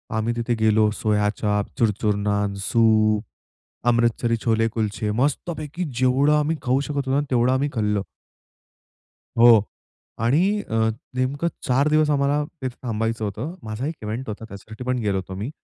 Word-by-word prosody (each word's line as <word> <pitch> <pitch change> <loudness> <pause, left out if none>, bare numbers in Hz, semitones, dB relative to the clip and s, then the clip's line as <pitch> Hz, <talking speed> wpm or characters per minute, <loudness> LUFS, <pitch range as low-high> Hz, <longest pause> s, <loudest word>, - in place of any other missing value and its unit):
आम्ही 110 +2 0
तिथे 120 +1 -1
गेलो 110 -1 +3
सोया-चाप, 105 -1 0
चुरचुर-नान, 105 -2 +1
सूप, 110 -2 +3 0.7
अमृतसरी 115 0 +2
छोले-कुलचे 110 -1 0
मस्तपैकी 155 +3 -2
जेवढं 130 +3 +3
आम्ही 155 +2 0
खाऊ 130 +1 +2
शकत 145 - -5
होतो 135 -2 -1
ना, 145 - +3
तेवढं 125 0 +3
आम्ही 140 +2 +1
खाल्लं. 105 -4 0 1.4
हो, 115 -3 +7 0.6
आणि 140 +8 +3 0.3
अ, 115 - -2 0.4
नेमकं 140 +6 0 0.2
4 135 +4 +3
दिवस 155 0 +3
आम्हाला 145 +1 +2 0.2
तिथे 130 -2 -4
थांबायचं 115 -1 -2
होतं. 140 - -4
माझा 110 +4 -4
एक 165 - -3
इव्हेंट 110 +5 -4
होता, 105 - -4
त्याच्यासाठी 110 +3 -10
पण 125 0 0
गेलो 100 -3 0
होतो 95 0 -5
मी 105 +7 -4
115 Hz, 140 wpm, -23 LUFS, 105-130 Hz, 1.4 s, हो